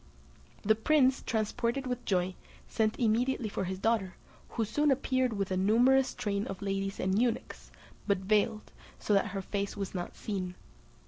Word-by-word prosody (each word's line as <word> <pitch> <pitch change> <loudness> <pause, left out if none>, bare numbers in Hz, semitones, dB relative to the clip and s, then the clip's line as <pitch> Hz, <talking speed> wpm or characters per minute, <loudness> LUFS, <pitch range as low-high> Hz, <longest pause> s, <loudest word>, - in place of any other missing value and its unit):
The 220 +1 +5
prince, 260 +3 +3
transported 235 +4 -1
with 250 -1 -3
joy, 185 -1 +1 0.3
sent 220 -1 0
immediately 235 0 +1
for 195 - -2
his 190 +1 -3
daughter, 195 -3 0 0.3
who 225 - -1
soon 295 +8 +1
appeared 260 -2 +1
with 195 -2 -2
a 185 - +1
numerous 245 +7 +4
train 205 -4 -2
of 195 +1 -6
ladies 195 0 -2
and 190 +4 +1
eunuchs, 245 -1 -2 0.4
but 200 -2 +3
veiled, 215 +3 0 0.3
so 210 - -1
that 195 - +3
her 195 -1 -4
face 200 +1 -3
was 195 -1 -4
not 175 -2 -5
seen. 185 -4 -4
215 Hz, 165 wpm, -30 LUFS, 195-245 Hz, 0.4 s, The